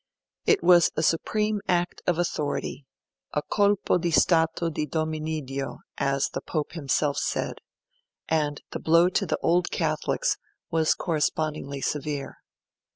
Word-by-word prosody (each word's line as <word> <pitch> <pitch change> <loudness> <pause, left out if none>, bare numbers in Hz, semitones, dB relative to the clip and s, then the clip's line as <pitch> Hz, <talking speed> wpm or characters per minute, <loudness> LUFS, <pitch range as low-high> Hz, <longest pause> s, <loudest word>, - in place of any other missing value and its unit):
It 430 -3 +4
was 175 -2 +6
a 155 - +1
supreme 210 +6 +1
act 175 -1 0
of 175 -2 +2
authority 150 -4 -2 0.5
a 150 - 0
'colpo 205 -3 +2
di 175 0 0
stato 165 0 +3
di 150 0 -2
Dominiddio', 155 -3 -3 0.2
as 140 0 +1
the - - -3
Pope 155 -3 -3
himself 145 -2 0
said - - -2 0.7
and 150 -3 0
the - - -4
blow 170 +2 +4
to 195 +1 0
the - - 0
Old 175 +1 +3
Catholics - - 0 0.3
was 160 -1 +3
correspondingly 155 -4 -1
severe. 145 -1 -3
160 Hz, 130 wpm, -26 LUFS, 150-175 Hz, 0.7 s, was